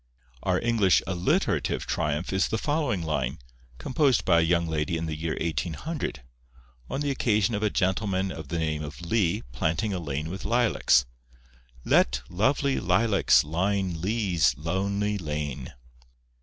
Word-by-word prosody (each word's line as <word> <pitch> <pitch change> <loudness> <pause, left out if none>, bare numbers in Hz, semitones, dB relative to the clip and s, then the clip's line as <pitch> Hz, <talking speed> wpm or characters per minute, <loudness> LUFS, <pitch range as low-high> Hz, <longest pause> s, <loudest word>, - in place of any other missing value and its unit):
Our - - +1
English 115 -5 +3
alliterative 90 -2 0
triumph 75 +5 -2
is 95 - +2
the 110 - -1
following 145 - -1
line, 75 -3 -2 0.4
composed 130 - +1
by 85 -2 +5
a - - +3
young 85 +1 +2
lady 80 0 -1
in 80 - -3
the 80 -1 -3
year 80 +1 -3
1800, 80 - -3 0.7
on 135 - -3
the 145 -1 0
occasion 110 -5 +1
of 105 - -1
a 105 - +2
gentleman 95 0 0
of 80 -5 -8
the 85 +4 -3
name 80 -2 -1
of 75 +3 -8
Lee 85 0 0
planting 80 - -1
a 90 - -2
lane 75 0 -4
with 95 - -6
lilacs:— 115 - +3 0.8
'Let 60 0 +3
lovely 135 +8 +1
lilacs 100 +3 +3
line 90 +2 -1
Lee's 90 - +1
lonely 100 +6 -1
lane! 75 -5 -4
90 Hz, 145 wpm, -26 LUFS, 80-105 Hz, 0.8 s, by